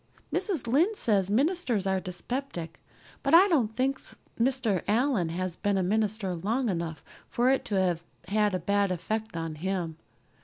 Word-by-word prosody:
Mrs. 365 - 0
Lynde 315 - +3
says 200 - +1
ministers 255 - +1
are 190 0 +1
dyspeptic, 180 - -5 0.4
but - - +4
I 370 +4 +8
don't 280 - +3
think 260 +5 -1 0.4
Mr. 235 -6 +1
Allan 220 - +2
has 180 +1 -3
been 200 +1 0
a 190 - +1
minister 210 0 0
long 220 +9 -1
enough 165 -4 -3 0.2
for 245 +2 +2
it 270 - +1
to 210 - -2
have 175 -3 0 0.2
had 210 0 +2
a - - -1
bad 200 +3 +1
effect 215 +2 -3
on 165 -1 -3
him. 170 0 -3
205 Hz, 160 wpm, -28 LUFS, 180-255 Hz, 0.4 s, I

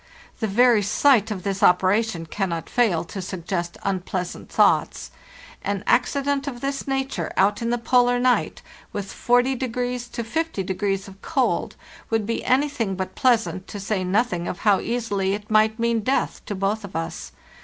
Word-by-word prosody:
The 220 - 0
very 235 +2 +4
sight 220 +2 +3
of 195 -4 -4
this 200 -1 -2
operation 185 0 +3
can 195 +4 -2
not 165 -1 -4
fail 205 -10 +2
to 190 +3 -7
suggest 175 -1 -4
unpleasant 185 -2 -3
thoughts. - - +2 0.5
An 200 0 -2
accident 280 +2 +1
of 250 -4 -4
this 275 +2 -3
nature 270 0 -2
out 200 +5 +3
in 230 - -1
the 240 - +1
polar 245 +1 +3
night, 250 0 +1 0.3
with 200 -1 -5
4o 245 +1 +2 0.5
to 235 - -3
50° 200 - -2
of 195 0 -14
cold, - - 0 0.3
would 225 -2 0
be 230 +2 -2
anything 255 -7 +1
but 185 0 -4
pleasant, 225 -7 +1
to 205 - -7
say 195 -1 -1
nothing 185 -2 0
of - - -3
how 205 -3 +4
easily 205 -5 -1
it 210 +1 -9
might 215 0 +4
mean 235 -1 +1
death 255 +6 -1
to 205 - -3
both 200 +3 -1
of 200 -3 -9
us. 165 0 -4
210 Hz, 165 wpm, -23 LUFS, 190-245 Hz, 0.5 s, very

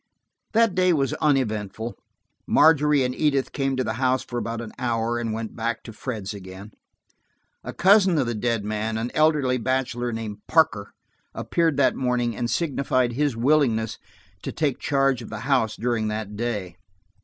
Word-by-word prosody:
That 225 -2 +4
day 185 -1 +3
was 135 -4 0
uneventful. 115 -6 0 0.5
Margery 150 -3 +4
and 125 0 -1
Edith 140 -2 0
came 135 -1 -1
to 130 - 0
the 110 - -2
house 130 0 +2
for 120 - -4
about 115 0 -4
an 115 -2 -7
hour 120 -1 -1
and 115 -1 -2
went 110 0 -5
back 115 0 -3
to 115 - -10
Fred's 110 -3 -5
again. 95 +1 -10 0.9
A - - -5
cousin 190 -2 +4
of 140 - +2
the 120 - -2
dead 115 -1 -1
man, 110 +1 -2
an 115 +2 -3
elderly 150 -5 +2
bachelor 125 -1 -1
named 110 -2 -5
Parker, 115 -11 +2 0.4
appeared 165 -4 0
that 140 - +4
morning 125 -2 0
and 120 +1 -2
signified 130 -3 0
his 140 -2 0
willingness 115 -5 +2 0.4
to - - -5
take 145 -5 -1
charge 135 -3 +1
of 115 - -9
the - - -6
house 125 -4 +1
during 115 -2 -1
that 105 -1 -4
day. 105 -6 -3
120 Hz, 165 wpm, -24 LUFS, 110-140 Hz, 0.9 s, That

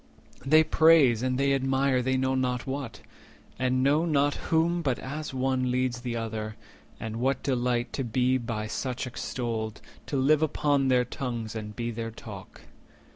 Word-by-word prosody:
They 155 +4 +6
praise 155 -7 +5
and 130 0 0
they 140 0 +2
admire 135 -1 +2
they 130 +1 +1
know 130 0 +1
not 125 -2 -1
what, 135 +1 -5 0.6
And 130 0 +1
know 145 +4 +3
not 145 -3 +2 0.2
whom, 170 +2 +2
but 135 -6 0
as 150 +3 -5
one 130 -1 0
leads 125 -1 0
the 120 -1 -3
other; 110 -1 -4 0.4
And 110 0 -5
what 130 +2 0
delight 125 -2 0
to 135 - -2
be 125 +2 +1
by 115 -3 -3
such 125 +4 -3
extolled, 115 -3 -4 0.3
To 140 - -1
live 145 +3 +4
upon 145 -3 +1
their 125 -1 +3
tongues, 120 -3 -4
and 105 -1 -6
be 120 0 -3
their 115 0 -4
talk? 105 -4 -11
130 Hz, 165 wpm, -27 LUFS, 120-140 Hz, 0.6 s, They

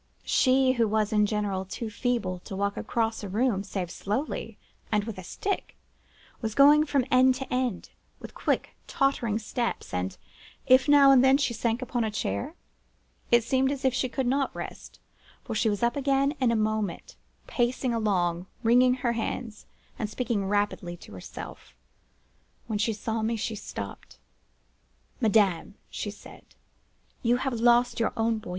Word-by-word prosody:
She, 260 0 +4
who 235 -3 +2
was 215 0 0
in 210 -1 +4
general 205 -3 -1
too 215 +4 -6
feeble 210 -6 -1
to 195 - -6
walk 200 +1 -1
across 225 -1 -1
the 205 - -6
room 215 -1 +1
save 190 -3 -4
slowly, 220 +10 -3 0.3
and 210 -1 +2
with 210 -3 -6
a - - -8
stick, 390 - -4 0.6
was 220 -2 -3
going 295 +2 +6
from 275 -3 +1
end 255 0 +5
to 265 0 -6
end 250 -7 -2 0.3
with - - -10
quick, - - -1 0.2
tottering 245 -6 0
steps; 230 - -3
and, 90 +1 -2 0.5
if 260 +1 +5
now 280 -1 +7
and 260 -2 +6
then 265 +1 +6
she 265 -4 0
sank 230 +2 -1
upon 245 -2 -1
a 220 - 0
chair, 100 - -3 0.7
it 240 -1 +5
seemed 265 +3 +1
as 275 -1 -4
if 260 - +3
she 255 0 0
could 265 +1 -2
not 270 +2 0
rest, - - -8 0.4
for - - -5
she 220 +1 +2
was 205 +2 -2
up 235 0 +2
again 275 0 +2
in 245 -2 +3
a - - +1
moment, 215 - -2 0.3
pacing 245 +1 0
along, 180 -5 0 0.2
wringing 250 +2 +5
her 250 -2 -1
hands, 230 -1 -4 0.3
and 215 - -2
speaking 215 -4 -2
rapidly 205 -3 -1
to - - -14
herself. 95 - -10 0.9
When 215 -2 -3
she 215 +2 +1
saw 220 +1 -3
me, 225 +1 0
she 225 +1 -3
stopped: 215 - -8 1.0
'Madame,' 205 -6 +2 0.2
she 210 - -4
said, 205 - -12 0.8
'you 240 +1 +2
have 265 0 -2
lost 240 +1 +3
your 230 - 0
own 225 0 +1
boy. 210 - -10
230 Hz, 165 wpm, -27 LUFS, 210-255 Hz, 1.0 s, now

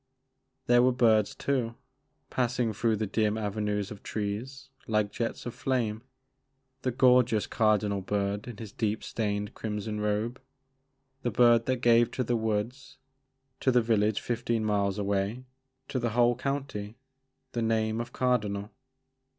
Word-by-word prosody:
There 120 0 +5
were 130 +1 +5
birds 110 -4 +3
too, 125 -5 -1 0.6
passing 120 -2 0
through 115 +2 +1
the 110 +1 -1
dim 105 +1 0
avenues 105 -1 -2
of 105 - -9
trees 125 +6 -4 0.2
like 105 -2 +1
jets 115 +2 -3
of 120 - -4
flame, 115 -5 -1 0.4
— 135 0 -48
the 130 - 0
gorgeous 125 -3 +4
Cardinal 105 -4 +1
Bird 100 +2 -2
in 120 -4 -7
his 110 -3 -8
deep 110 0 -2
stained 105 -1 -2
crimson 105 0 -4
robe, 105 +4 -1 0.4
— 135 0 -46
^the 120 - 0
bird 120 +1 +5
that 130 -2 0
gave 120 -1 +5
to 130 - 0
the 120 0 0
woods, 110 +5 -2 0.6
to 130 - +2
the 125 -1 +4
village 110 -2 +2
fifteen 120 -2 -1
miles 100 -1 +1
away, 100 +4 -1 0.5
to 130 - -1
the 120 -1 0
whole 120 0 +5
county, 130 -5 -4 0.5
the 120 - -2
name 110 0 +1
of 120 +1 -7
Cardinal. 105 -6 0
115 Hz, 150 wpm, -29 LUFS, 105-125 Hz, 0.6 s, There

